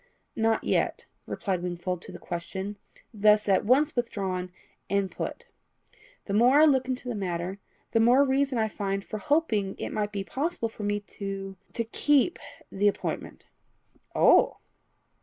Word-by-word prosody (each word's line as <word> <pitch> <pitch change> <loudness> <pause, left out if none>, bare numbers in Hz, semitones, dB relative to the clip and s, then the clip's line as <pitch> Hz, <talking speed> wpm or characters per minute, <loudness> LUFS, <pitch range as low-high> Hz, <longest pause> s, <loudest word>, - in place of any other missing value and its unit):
"Not 225 0 +1
yet," - - 0 0.2
replied 190 -4 -2
Wingfold 175 0 -3
to - - -7
the - - -8
question 190 +4 -5 0.4
thus 210 0 +4
at 195 0 +3
once 285 +7 +3
withdrawn 195 -7 -2 0.4
and 200 -1 +1
put. - - -5 0.8
"The 200 - -3
more 245 +7 +5
I 310 - +8
look 265 -4 +3
into 255 -1 -3
the 245 - -1
matter, 185 -1 -3 0.3
the 225 - +3
more 245 +5 +6
reason 270 -1 +1
I 220 -1 +2
find 195 -2 -3
for 215 - -5
hoping 215 -7 +1
it - - -4
may 210 -1 0
be 200 -1 -4
possible 270 - -2
for 220 - -11
me 205 0 -1
to 195 -1 -6 0.2
to 230 - -1
keep 290 +7 +2 0.3
the 205 +2 +2
appointment." 205 - -3 0.7
"Oh!" - - +5
210 Hz, 155 wpm, -27 LUFS, 195-250 Hz, 0.8 s, I